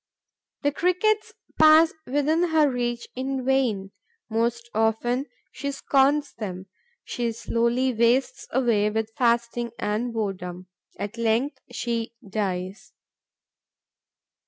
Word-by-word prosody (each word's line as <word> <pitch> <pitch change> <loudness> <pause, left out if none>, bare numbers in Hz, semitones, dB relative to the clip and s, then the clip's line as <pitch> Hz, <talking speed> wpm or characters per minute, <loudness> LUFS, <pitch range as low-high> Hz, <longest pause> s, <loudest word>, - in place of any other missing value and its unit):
The 285 - +3
Crickets 365 +7 +1 0.3
pass 315 +1 +7
within 295 +5 +2
her 315 -2 +4
reach 240 -2 -2
in 260 0 -3
vain; 235 -8 +1 0.4
most 235 +1 0
often 225 +5 +1 0.2
she 280 +1 -4
scorns 280 +1 +2
them. 190 -4 -6 0.4
She 240 -1 -2
slowly 235 +3 0
wastes 235 +3 +1
away 230 -5 +2
with 220 +1 -2
fasting 235 -1 +1
and 215 +4 -1
boredom. 185 -5 -4 0.3
At 210 +3 -5
length, 230 +5 +1
she 235 -1 -3
dies. 195 +2 -3
240 Hz, 105 wpm, -25 LUFS, 220-270 Hz, 0.4 s, pass